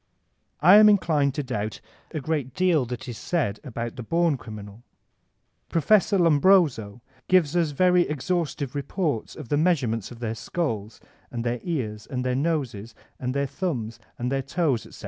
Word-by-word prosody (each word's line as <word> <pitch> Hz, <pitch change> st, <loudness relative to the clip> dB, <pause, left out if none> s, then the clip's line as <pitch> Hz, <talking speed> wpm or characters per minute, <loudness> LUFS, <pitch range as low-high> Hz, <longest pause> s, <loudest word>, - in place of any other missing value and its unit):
I 180 Hz, +6 st, +8 dB
am 215 Hz, 0 st, +8 dB
inclined 155 Hz, -9 st, +2 dB
to 145 Hz, -, -2 dB
doubt 110 Hz, -5 st, -4 dB, 0.3 s
a 155 Hz, -, -4 dB
great 140 Hz, -3 st, -3 dB
deal 175 Hz, -8 st, +2 dB
that 125 Hz, +2 st, -6 dB
is 115 Hz, -4 st, -6 dB
said 125 Hz, -, -1 dB
about 120 Hz, -3 st, -5 dB
the -, -, -4 dB
bom 165 Hz, +5 st, +1 dB
criminal. 105 Hz, -3 st, -10 dB, 0.9 s
Prof. 190 Hz, +7 st, +3 dB
Lombroso 155 Hz, -, +3 dB, 0.2 s
gives 175 Hz, -4 st, +3 dB
us 170 Hz, -3 st, +2 dB
very 180 Hz, +4 st, +3 dB
exhaustive 150 Hz, -2 st, -2 dB
reports 145 Hz, -, -2 dB
of 150 Hz, -7 st, -9 dB
the 145 Hz, -, +2 dB
measurements 130 Hz, -, +1 dB
of 120 Hz, -, -11 dB
their 115 Hz, -2 st, -3 dB
skulls 115 Hz, -4 st, -4 dB, 0.3 s
and 120 Hz, -1 st, -4 dB
their 120 Hz, 0 st, -1 dB
ears 110 Hz, -11 st, -4 dB
and 125 Hz, -1 st, -3 dB
their 125 Hz, -, +1 dB
noses 130 Hz, -8 st, -2 dB, 0.2 s
and 125 Hz, +1 st, -3 dB
their 140 Hz, 0 st, +1 dB
thumbs 135 Hz, -, -4 dB, 0.2 s
and 125 Hz, +2 st, -2 dB
their 135 Hz, 0 st, 0 dB
toes, 140 Hz, -3 st, -1 dB
etc. -, -, -14 dB
140 Hz, 165 wpm, -25 LUFS, 120-170 Hz, 0.9 s, I